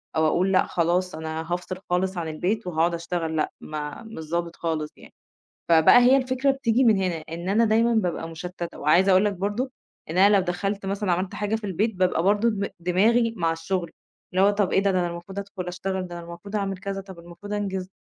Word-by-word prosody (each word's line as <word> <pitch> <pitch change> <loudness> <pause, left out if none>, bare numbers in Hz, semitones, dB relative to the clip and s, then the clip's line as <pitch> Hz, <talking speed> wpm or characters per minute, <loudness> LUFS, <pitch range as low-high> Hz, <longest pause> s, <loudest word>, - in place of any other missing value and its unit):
أو 160 0 +3
أقول 185 +4 +2
لأ 185 - +4
خلاص، 175 0 0
أنا 160 +1 -5
هافصِل 180 +1 -4
خالص 185 +1 0
عن 165 -2 -2
البيت 180 +7 -2
وهاقعد 170 0 +1
أشتغل. 170 -1 -3
لأ، 155 - 0
ما 150 +6 -6
مش 160 -9 -9
ضابط 170 0 -2
خالص 155 -2 -3
يعني. - - -16 0.6
فبقى 160 +4 +7
هي 255 +2 +6
الفكرة 260 +1 +1
بتيجي 260 -2 +1
من 220 -4 +5
هنا، 180 -4 -1
إن 170 +3 -5
أنا 225 +3 +4
دايمًا 230 +2 +3
بابقى 175 -6 -1
مُشتتّة، 175 +1 -7
وعايزة 175 +6 +4
أقول 185 +2 +5
لَك 205 - +1
برضه 205 +8 -2 0.4
إن 170 - -3
أنا 200 +2 +6
لو 195 - +4
دخلت 195 +3 -2
مثلًا 195 -1 -1
عملت 185 +2 -1
حاجة 210 +1 -1
في 220 - -6
البيت، 205 +2 -1
بقى 180 -2 +1
برضه 205 +4 +3
دم 200 -2 -2
دماغي 225 +7 +2
مع 165 -1 +1
الشغل. 170 +1 -3 0.4
اللي 185 - +3
هو 200 - +6
طَب 205 -2 +1
إيه - - +4
ده؟ 195 0 +2
ده 185 - +1
أنا 175 - 0
المفروض 175 +3 -7
أدخُل 195 -2 -6
أشتغل، 185 +1 -3
ده 175 0 -7
المفروض 170 +5 -8
أعمل 195 -2 -1
كذا، 195 +1 -4
طَب 190 -3 -12
المفروض 175 +5 -9
أنجز 190 -2 -3
185 Hz, 215 wpm, -25 LUFS, 170-205 Hz, 0.6 s, فبقى